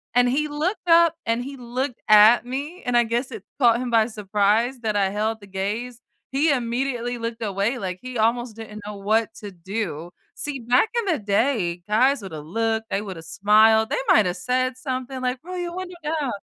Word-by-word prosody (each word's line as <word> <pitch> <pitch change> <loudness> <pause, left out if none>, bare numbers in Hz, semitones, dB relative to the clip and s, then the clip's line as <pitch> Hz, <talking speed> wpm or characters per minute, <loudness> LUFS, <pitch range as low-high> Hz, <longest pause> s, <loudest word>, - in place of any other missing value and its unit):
And 245 0 +5
he 300 +4 0
looked 350 +6 -3
up 335 -1 +6
and 230 +2 0
he 275 +2 -8
looked 250 +1 -4
at 215 +3 +7
me, 285 +8 -5
and 245 -1 +1
I 240 - +5
guess 240 +3 -2
it 220 -5 -8 0.2
caught 235 -3 +4
him 250 -1 -3
by 225 -1 +4
surprise 215 +3 0
that 215 -2 -1
I 195 -1 +2
held 215 +3 -2
the 200 - -13
gaze, 215 +6 -4 0.3
he 290 +4 +2
immediately 245 -1 -1
looked 230 0 -4
away, 205 +4 -1
like, 185 -2 -4
he 255 -1 -6
almost 230 +1 0
didn't 215 -1 -9
know 210 0 -6
what 220 +3 0
to 205 -2 -9
do. 175 -3 -5 0.3
See, 290 -2 -4
back 245 - +2
in 470 - 0
the 355 -5 0
day, 200 -4 0
guys 255 +5 +3
would've 160 -6 -7
looked, 225 +5 -1
they 195 - -1
would've 185 -6 -8
smiled, 215 +5 +4
they - - -1
might 360 - +5
have 180 - -2
said 255 +6 0
something 255 -1 -4
like, 255 0 -1
"Roll 365 +2 -6
your 350 -1 -4
window 365 -1 -6
down." 300 -4 -1
235 Hz, 200 wpm, -23 LUFS, 210-260 Hz, 0.3 s, at